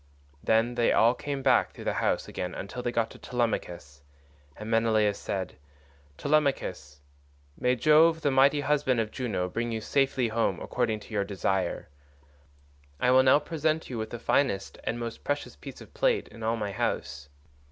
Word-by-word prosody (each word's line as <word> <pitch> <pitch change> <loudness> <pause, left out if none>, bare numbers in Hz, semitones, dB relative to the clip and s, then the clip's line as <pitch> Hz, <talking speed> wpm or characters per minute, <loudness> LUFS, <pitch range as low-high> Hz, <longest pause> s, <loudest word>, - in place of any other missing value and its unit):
131 - - -21 0.2
Then 120 - -6
they 120 -1 +2
all 115 +2 +5
came 140 0 -5
back 130 -2 +4
through - - -10
the - - -1
house - - 0
again 90 -1 -5
till 125 - -6
they 120 - -2
got 115 -1 0
to - - -13
Telemachus, 85 - -3 0.6
and 105 - -7
Menelaus 110 -2 +2
said, 95 -2 -4 0.6
"Telemachus, 140 - -1 0.5
may 125 +6 +1
Jove, 160 +5 +4
the 145 -2 +1
mighty 140 +2 +4
husband 140 -3 +1
of 110 -1 -1
Juno, 105 -8 -2
bring 115 +5 -3
you 110 - -2
safely 130 +2 +1
home 110 -5 0
according 110 -4 -2
to 110 - -12
your 100 -2 +1
desire. 95 -2 -2 1.1
I 125 - +3
will 130 +1 +7
now 130 +1 +6
present 155 0 -2
you 120 - -4
with 110 0 -4
the 120 - -6
finest 115 -4 0
and 120 - -2
most 115 -1 -6
precious 145 - -3
piece 70 - -11
of - - -14
plate - - +1
in 115 - -13
all 110 +1 0
my 105 -2 -3
house. 75 -5 -3
115 Hz, 175 wpm, -28 LUFS, 105-135 Hz, 1.1 s, will